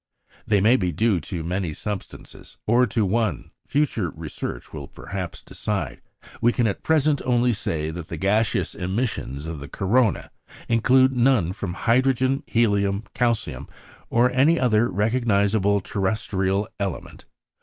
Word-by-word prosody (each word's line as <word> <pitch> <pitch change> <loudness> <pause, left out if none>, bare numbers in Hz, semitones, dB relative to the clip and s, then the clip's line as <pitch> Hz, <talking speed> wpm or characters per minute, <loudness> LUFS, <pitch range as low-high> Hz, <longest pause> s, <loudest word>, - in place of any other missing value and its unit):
They 105 -2 +3
may 115 +6 +5
be 90 -5 0
due 110 -1 +2
to 85 +1 -5
many 90 -1 -2
substances, 105 +3 -7
or 120 +3 +4
to 110 0 0
one; 110 +1 -1 0.2
future 135 - 0
research 80 0 -7
will - - -6
perhaps 95 -3 -7
decide; 100 -10 -4 0.4
we 120 +1 +4
can 120 -1 +1
at 100 - -1
present 155 -2 +2
only 120 -1 +2
say 80 -6 -2
that 85 0 -7
the 85 - -6
gaseous 105 +5 +1
emission 90 - -3
of 80 -2 -5
the 70 - -8
corona 110 - +1 0.4
include 130 +3 +4
none 120 -8 +3
from 90 -2 -5
hydrogen, 130 +5 +2
helium, 100 -3 +1
calcium, 115 -3 -1 0.4
or 120 +2 +3
any 140 +7 +4
other 120 -2 +3
recognisable 100 -2 +2
terrestrial 95 0 -1
element. 100 -4 -5
105 Hz, 135 wpm, -24 LUFS, 95-120 Hz, 0.4 s, may